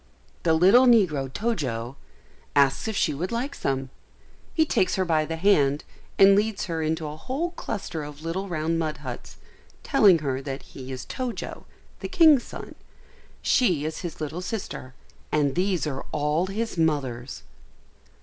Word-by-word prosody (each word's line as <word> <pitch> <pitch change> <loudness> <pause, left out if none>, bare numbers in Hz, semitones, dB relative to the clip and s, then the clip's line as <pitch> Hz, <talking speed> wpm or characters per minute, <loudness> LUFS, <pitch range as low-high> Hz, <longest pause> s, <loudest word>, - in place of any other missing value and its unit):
The 160 -2 +3
little 200 +10 +6
negro, 170 - +4
Tojo, 130 - -2 0.6
asks 140 +7 +3
if 220 -2 -2
she 155 - +2
would 170 +7 -3
like 250 +5 -2
some; 135 - -2 0.6
he 315 - +2
takes 210 -11 +1
her 190 - 0
by 160 -3 +2
the 165 - -3
hand, 150 -6 +3 0.3
and 195 0 +7
leads 210 0 0
her 165 -4 -3
into 160 +1 -1
a 150 0 -5
whole 275 - -3
cluster 195 - -5
of 150 +1 -9
little 180 +4 -3
round 165 0 -1
mud 155 -2 -2
huts, 125 -1 -7 0.5
telling 195 -5 +5
her 135 -1 -1
that 135 0 -6
he 130 0 -10
is 130 -1 -6
Tojo, 250 -3 -5 0.3
the - - -4
king's 325 -8 +6
son; - - -9 0.7
she 180 - +2
is 155 0 -4
his 175 -3 -6
little 155 +3 -4
sister, 145 - -5 0.4
and 145 -3 +2
these 180 0 0
are 135 -3 -3
all 150 +4 0
his 215 -1 -3
mothers! 135 -6 -1
160 Hz, 160 wpm, -25 LUFS, 145-200 Hz, 0.7 s, and